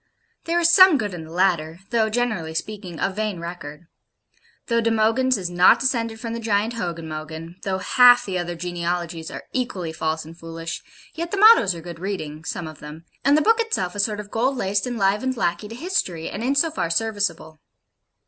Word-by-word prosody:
There 335 Hz, +1 st, +1 dB
is 340 Hz, -, +4 dB
some 370 Hz, -2 st, +8 dB
good 210 Hz, -6 st, -3 dB
in 165 Hz, -2 st, -7 dB
the 160 Hz, -, -13 dB
latter 170 Hz, -3 st, +1 dB
though, 225 Hz, -2 st, +2 dB
generally 215 Hz, -9 st, -2 dB
speaking, 185 Hz, -2 st, -5 dB
a 195 Hz, -, 0 dB
vain 210 Hz, -2 st, -3 dB
record: 170 Hz, -2 st, -8 dB, 0.8 s
though 230 Hz, -1 st, +1 dB
De 230 Hz, -, +1 dB
Mogyns 225 Hz, +3 st, +2 dB
is 185 Hz, -3 st, -3 dB
not 175 Hz, +1 st, +5 dB
descended 230 Hz, -4 st, -1 dB
from 230 Hz, 0 st, -5 dB
the 230 Hz, -, -4 dB
giant 220 Hz, 0 st, 0 dB
Hogyn 170 Hz, -7 st, -4 dB
Mogyn; 160 Hz, +2 st, -7 dB
though 190 Hz, -1 st, -2 dB
half 245 Hz, +5 st, +6 dB
the 185 Hz, -2 st, -2 dB
other 175 Hz, 0 st, -4 dB
genealogies 170 Hz, -1 st, -3 dB
are -, -, -8 dB
equally 195 Hz, -11 st, -3 dB
false 160 Hz, 0 st, -2 dB
and 165 Hz, +1 st, -11 dB
foolish; 165 Hz, -1 st, -7 dB, 0.3 s
yet 335 Hz, +1 st, -4 dB
the 400 Hz, -, -3 dB
mottoes 405 Hz, -, +7 dB
are 165 Hz, -, -8 dB
good 170 Hz, -1 st, -9 dB
reading 160 Hz, -5 st, -5 dB
some 170 Hz, -, -4 dB
of 155 Hz, -1 st, -9 dB
them; 155 Hz, +2 st, -10 dB, 0.2 s
and 285 Hz, +3 st, +4 dB
the 305 Hz, -, +2 dB
book 450 Hz, +1 st, +4 dB
itself 195 Hz, -, -1 dB
a 205 Hz, -, -6 dB
sort 210 Hz, +1 st, 0 dB
of 205 Hz, -1 st, -8 dB
gold 255 Hz, +4 st, 0 dB
laced 200 Hz, +1 st, 0 dB
and 245 Hz, -1 st, -3 dB
livened 210 Hz, +6 st, +1 dB
lackey 175 Hz, 0 st, -1 dB
to 225 Hz, -, -9 dB
History, 240 Hz, -, -2 dB
and 210 Hz, -, -5 dB
in 270 Hz, +3 st, +1 dB
so 320 Hz, +3 st, +3 dB
far 170 Hz, -, -2 dB
serviceable. 195 Hz, -5 st, -2 dB
195 Hz, 205 wpm, -23 LUFS, 170-235 Hz, 0.8 s, some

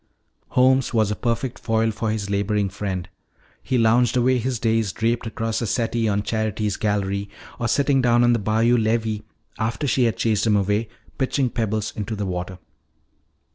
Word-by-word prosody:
Holmes 130 Hz, 0 st, +3 dB
was 110 Hz, -2 st, +2 dB
a -, -, -1 dB
perfect 120 Hz, +2 st, -2 dB
foil 115 Hz, -1 st, +1 dB
for 110 Hz, +1 st, -3 dB
his 105 Hz, -2 st, -2 dB
laboring 100 Hz, 0 st, 0 dB
friend. 95 Hz, -2 st, -4 dB, 0.5 s
He 130 Hz, -, -1 dB
lounged 120 Hz, +1 st, +3 dB
away 125 Hz, +1 st, +3 dB
his 125 Hz, +1 st, -1 dB
days 110 Hz, -3 st, +1 dB
draped 115 Hz, +5 st, -1 dB
across 115 Hz, 0 st, -2 dB
the 115 Hz, -, -2 dB
settee 115 Hz, +1 st, 0 dB
on 100 Hz, 0 st, 0 dB
Charity's 110 Hz, -2 st, -1 dB
gallery 100 Hz, -1 st, -1 dB, 0.3 s
or 120 Hz, -, 0 dB
sitting 135 Hz, +2 st, +2 dB
down 120 Hz, -1 st, +4 dB
on 120 Hz, 0 st, +4 dB
the 115 Hz, -, +1 dB
bayou 110 Hz, +4 st, +2 dB
levee 110 Hz, -1 st, 0 dB, 0.4 s
after 115 Hz, +6 st, -1 dB
she 130 Hz, -2 st, +2 dB
had 115 Hz, -, 0 dB
chased 110 Hz, -1 st, +1 dB
him 105 Hz, -, +4 dB
away 105 Hz, +2 st, 0 dB, 0.3 s
pitching 130 Hz, -1 st, 0 dB
pebbles 110 Hz, -1 st, -2 dB
into 110 Hz, +1 st, -4 dB
the 105 Hz, -1 st, -3 dB
water. 90 Hz, 0 st, -4 dB
110 Hz, 175 wpm, -23 LUFS, 105-120 Hz, 0.5 s, down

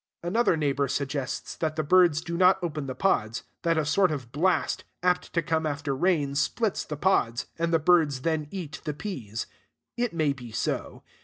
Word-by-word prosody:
Another 180 Hz, 0 st, +2 dB
neighbor 140 Hz, -2 st, +1 dB
suggests 140 Hz, 0 st, -3 dB
that 155 Hz, -1 st, -1 dB
the 155 Hz, -, 0 dB
birds 170 Hz, -1 st, +4 dB
do 170 Hz, 0 st, -4 dB
not 185 Hz, +2 st, +5 dB
open 155 Hz, -4 st, -3 dB
the 130 Hz, -, -4 dB
pods; 115 Hz, -, 0 dB, 0.2 s
that 165 Hz, -1 st, +1 dB
a 155 Hz, -, +1 dB
sort 185 Hz, +5 st, +3 dB
of 135 Hz, -6 st, -5 dB
blast, 175 Hz, +7 st, +1 dB, 0.2 s
apt 180 Hz, 0 st, +1 dB
to 170 Hz, -, +1 dB
come 160 Hz, 0 st, 0 dB
after 145 Hz, -2 st, -2 dB
rain, 150 Hz, -3 st, +1 dB
splits 195 Hz, +9 st, 0 dB
the 150 Hz, -, -6 dB
pods, 145 Hz, -10 st, +1 dB
and 170 Hz, 0 st, 0 dB
the 165 Hz, -, +5 dB
birds 155 Hz, -5 st, +3 dB
then 160 Hz, -1 st, -1 dB
eat 165 Hz, -7 st, -6 dB
the 150 Hz, -, -3 dB
peas. 125 Hz, -, -5 dB, 0.5 s
It 240 Hz, -1 st, 0 dB
may 155 Hz, -4 st, +1 dB
be 125 Hz, -4 st, -10 dB
so. -, -, -3 dB
155 Hz, 185 wpm, -27 LUFS, 140-175 Hz, 0.5 s, not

